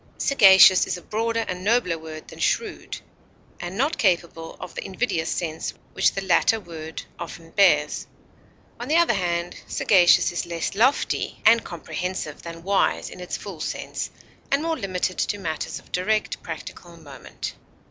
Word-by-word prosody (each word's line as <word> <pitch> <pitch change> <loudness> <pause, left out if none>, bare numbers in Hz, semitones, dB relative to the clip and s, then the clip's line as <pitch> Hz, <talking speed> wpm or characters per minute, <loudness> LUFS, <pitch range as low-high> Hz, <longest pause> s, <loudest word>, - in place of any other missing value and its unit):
Sagacious 190 -7 +7
is - - -2
a - - -11
broader 230 +1 -1
and 180 0 -4
nobler 215 -5 +2
word 155 -1 -9
than - - -12
shrewd, 445 -3 -1 0.6
and 175 +2 -6
not 285 +7 0
capable 170 -4 0
of 175 - -8
the - - -5
invidious 190 -5 -2
sense 160 -2 -3 0.2
which - - +3
the 195 - -3
latter 195 +4 +3
word 160 -4 -8 0.2
often 165 -1 -8
bears; 150 -7 +3 0.7
on 240 - -5
the 305 - +1
other 340 -7 +4
hand, 175 -3 -1
sagacious 180 -2 +4
is 175 - -3
less 170 -1 -3
lofty 245 +8 +1
and 230 +1 +6
comprehensive 175 -2 -5
than 165 0 -9
wise 190 - +1
in - - -11
its 180 - -4
full 195 -6 -8
sense, - - -4 0.4
and 280 +2 +1
more 330 0 0
limited 185 - -2
to 205 - 0
matters 160 -5 -4
of - - -15
direct 215 +4 0
practical - - -8
moment. - - -8
185 Hz, 155 wpm, -24 LUFS, 170-220 Hz, 0.7 s, Sagacious